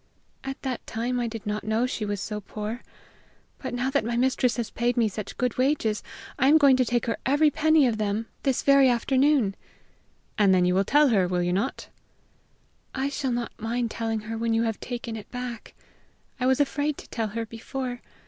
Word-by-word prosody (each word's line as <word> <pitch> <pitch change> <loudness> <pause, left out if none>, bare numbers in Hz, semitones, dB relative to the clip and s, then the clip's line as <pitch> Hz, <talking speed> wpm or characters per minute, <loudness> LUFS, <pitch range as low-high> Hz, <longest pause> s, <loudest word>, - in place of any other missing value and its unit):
"At 270 0 -5
that 260 -3 -4
time 240 +3 -2
I 240 - 0
did 225 -1 -7
not 210 0 -2
know 220 +3 +1
she 230 -4 -3
was 205 -1 -2
so 210 +1 -4
poor. 215 +4 -5 0.8
But - - -5
now 250 +2 -1
that 280 -2 +1
my 235 +1 -2
mistress 250 -1 +2
has 235 -2 -3
paid 240 +1 0
me 230 -2 +4
such 210 0 -6
good 250 -1 -1
wages, 255 -6 +1 0.4
I 265 - +4
am 300 +3 +7
going 280 -4 +6
to 255 - +3
take 240 0 0
her 230 - -1
every 290 +3 +3
penny 315 0 +4
of 225 -3 0
them 210 +1 -1 0.2
this 270 -3 0
very 275 -1 +6
afternoon." 260 -2 +2 0.9
"And 195 -2 +5
then 180 -1 +3
you 180 - +2
will 195 +2 +2
tell 295 +4 +4
her, 195 -6 +3
will 180 0 0
you 175 0 0
not?" 210 +9 -2 1.1
"I 270 +1 0
shall 280 -1 -2
not 240 0 -2
mind 230 +1 -2
telling 225 -1 -2
her 225 +1 -5
when 230 0 +1
you 225 - +2
have 225 -2 -2
taken 235 -2 -5
it 215 -2 -9
back. 245 -2 -7 0.6
I 250 - +1
was 260 +1 +3
afraid 290 +1 0
to - - -11
tell 225 -2 -2
her 225 +2 -4
before! 245 +2 -5
240 Hz, 205 wpm, -26 LUFS, 220-265 Hz, 1.1 s, am